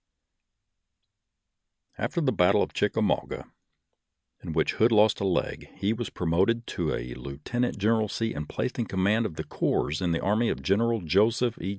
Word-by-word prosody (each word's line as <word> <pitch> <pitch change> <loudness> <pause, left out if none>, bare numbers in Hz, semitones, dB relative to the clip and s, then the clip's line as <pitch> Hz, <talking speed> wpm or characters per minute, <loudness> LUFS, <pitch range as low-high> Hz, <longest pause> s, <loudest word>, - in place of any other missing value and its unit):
After 170 - -1
the 140 -4 +2
battle 90 -5 +3
of - - -5
Chickamauga, - - -1 0.9
in - - -6
which - - +1
Hood 115 +2 +3
lost 110 -1 +4
a - - -2
leg, 90 -3 -1
he 100 +3 0
was 115 -1 -4
promoted 95 +8 +1
to 80 -4 -2
a - - -5
lieutenant 70 - -3
generalcy 110 +1 0
and 75 0 -5
placed 125 - -3
in 115 - 0
command 100 +4 +1
of 80 - -11
a - - -1
corps 75 +4 -1
in 90 -2 0
the 80 - 0
army 110 +4 +1
of - - -3
General 115 +3 +2
Joseph 110 +8 +2
E. 95 - -3
105 Hz, 165 wpm, -27 LUFS, 85-115 Hz, 0.9 s, lost